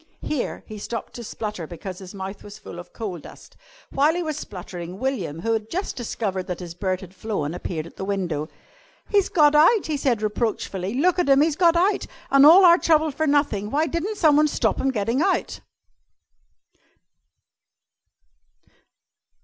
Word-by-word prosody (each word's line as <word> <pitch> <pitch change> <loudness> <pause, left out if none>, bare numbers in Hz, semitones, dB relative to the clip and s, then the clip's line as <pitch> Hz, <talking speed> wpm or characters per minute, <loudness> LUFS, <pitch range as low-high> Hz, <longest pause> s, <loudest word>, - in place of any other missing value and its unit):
Here 290 -5 -3
he 215 -2 -9
stopped 230 +2 -6
to 240 - -8
splutter 210 -6 -5
because 180 +3 -8
his 190 +1 -10
mouth 195 +1 -7
was 205 0 -10
full 175 - -10
of 175 0 -11
coal 195 -6 -5
dust. - - -14 0.4
While 295 +4 +2
he 350 - -1
was 310 -2 -3
spluttering, 180 - -8
William, 195 - -3
who 225 +4 0
had 220 -1 -3
just 375 +4 -3
discovered 200 -6 -3
that 180 - -4
his 175 -2 -7
bird 185 0 -2
had 185 -1 -11
flown, 195 -7 -3
appeared 170 -3 -4
at 170 - -14
the - - -5
window. 175 -6 -2 0.6
"He's 405 -2 +2
got 300 -3 +4
out," 335 +8 +5
he 305 -2 -2
said 245 -6 0
reproachfully. 210 -2 -2
"Look 360 +6 +2
at 350 - +1
him. 275 +1 +6
He's 310 -1 +2
got 340 0 +4
out. 380 +4 +1 0.2
An' 275 0 +7
all 360 +5 +9
our 345 0 +7
trouble 315 -1 +3
for 315 +3 -1
nothing. 280 -9 +1
Why 295 +6 +1
di'n't 340 +7 -3
someone 305 -3 +4
stop - - 0
him 270 - +1
gettin' 230 +2 0
out?" 380 +2 0
230 Hz, 175 wpm, -23 LUFS, 190-305 Hz, 0.6 s, all